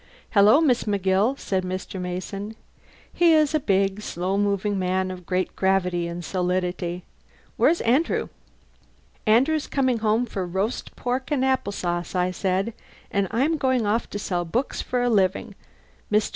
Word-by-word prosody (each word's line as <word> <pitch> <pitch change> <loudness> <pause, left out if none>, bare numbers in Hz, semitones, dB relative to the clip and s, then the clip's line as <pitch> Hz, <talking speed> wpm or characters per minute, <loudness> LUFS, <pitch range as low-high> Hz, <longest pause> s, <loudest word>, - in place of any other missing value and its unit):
"Hello, 210 +6 +6
Miss 255 -6 +2
McGill," 200 +4 +1
said 190 -7 -2
Mr. 185 0 -5
Mason. 195 +4 -5 0.6
He 340 -1 +5
is 310 -1 +3
a 310 - +3
big, 195 -4 +1
slow 185 -1 -2
moving 200 0 0
man 185 0 0
of 180 -2 -9
great 185 0 -1
gravity 180 -2 +1
and 170 0 -6
solidity. 180 -1 -2 0.5
"Where's 340 - +3
Andrew?" 265 +9 +1 1.0
"Andrew's 270 +8 +3
coming 260 -4 +1
home 220 +2 +2
for 195 -5 -4
roast 190 +6 -3
pork 250 +2 -2
and 275 -3 +1
apple 260 -4 +1
sauce," 175 -1 -3
I 180 0 +1
said, 190 +4 -1 0.4
"and 200 -1 +1
I'm 285 +8 +1
going 260 -5 +1
off 215 +3 0
to - - -5
sell 180 -3 -2
books 235 +11 -2
for 250 -1 -1
a - - +2
living. 200 -1 +1 0.6
Mr. 210 0 +2
200 Hz, 155 wpm, -24 LUFS, 185-245 Hz, 1.0 s, Hello